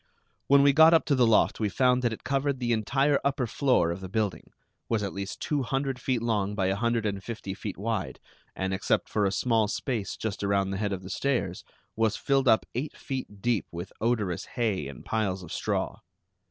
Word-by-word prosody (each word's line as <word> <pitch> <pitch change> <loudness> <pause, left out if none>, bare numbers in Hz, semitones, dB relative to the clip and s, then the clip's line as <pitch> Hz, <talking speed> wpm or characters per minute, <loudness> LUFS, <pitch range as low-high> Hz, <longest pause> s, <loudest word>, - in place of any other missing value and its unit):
When 140 0 +6
we 140 0 +6
got 160 +3 +7
up 160 - +3
to 150 - +2
the 125 -3 +4
loft 110 - +3
we 105 -2 +1
found 125 +3 +3
that 120 -2 +1
it 110 - -7
covered 140 0 0
the 120 -1 -1
entire 135 +6 +2
upper 140 -2 0
floor 120 - +2
of 85 +3 -5
the 95 - -7
building; 105 -1 -2 0.4
was 110 -2 +1
at 100 - -3
least 100 0 -5
two 150 -2 0
hundred 135 0 -2
feet 125 -3 0
long 105 -3 0
by 95 -2 0
a 95 +1 +1
hundred 115 +1 0
and 100 -2 -2
fifty 110 -4 -5
feet 100 0 -6
wide, 105 0 -3 0.4
and 95 0 -2
except 95 - 0
for 105 -2 +1
a 95 - +1
small 110 +3 +2
space 115 -1 -3
just 105 -2 -4
around 100 -1 +1
the 95 - -2
head 100 -1 -1
of 95 -1 -4
the 95 - -7
stairs, 120 -8 -1 0.3
was 110 -1 +1
filled 135 -1 +1
up 110 -2 +5
eight 135 +6 -4
feet 130 -7 -6
deep 120 -5 +1
with 85 +1 -7
odorous 110 -7 0
hay 105 - 0
and 70 -3 -10
piles 95 -4 -1
of 85 - -8
straw. - - -2
110 Hz, 215 wpm, -28 LUFS, 100-130 Hz, 0.4 s, got